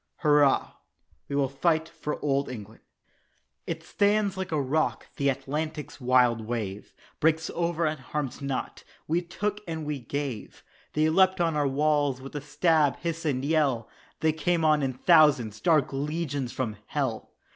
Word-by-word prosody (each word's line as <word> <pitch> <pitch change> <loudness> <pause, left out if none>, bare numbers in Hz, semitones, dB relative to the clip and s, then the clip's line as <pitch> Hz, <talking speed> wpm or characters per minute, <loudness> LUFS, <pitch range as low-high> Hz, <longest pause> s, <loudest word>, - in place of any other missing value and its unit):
"Hurrah, 145 -3 +4 0.6
we 140 - -3
will 140 -1 +2
fight 160 +4 +1
for 160 -2 -5
Old 140 -1 +1
England." 110 -3 -9 0.9
It - - -4
stands 205 -1 +1
like 190 -1 -4
a 155 - +1
rock 145 +3 0
the 140 -1 +2
Atlantic's 150 +3 -4
wild 125 -2 +4
wave 105 -4 -4 0.3
Breaks 160 +1 +2
over 170 -1 0
and 155 0 -1
harms 145 -2 -4
not. 140 -2 -4 0.2
We 165 +3 +1
took 205 +4 -3
and 160 -2 -4
we 150 -2 -3
gave 130 -2 -5 0.3
They 155 +1 +3
leapt 190 +2 +4
on 165 -2 +1
our 145 -1 +2
"walls" 145 -1 +1
with 135 +1 -10
stab, 155 -3 +2
hiss, 165 -1 -4
and 135 -3 0
yell 140 -7 +1 0.3
They 160 -1 +3
came 160 +1 0
on 155 -1 +4
in 135 -1 -1
thousands, 130 - +4
dark 155 -6 +3
legions 145 -2 -2
from 110 -5 -3
hell! - - -3
150 Hz, 155 wpm, -27 LUFS, 135-160 Hz, 0.9 s, Hurrah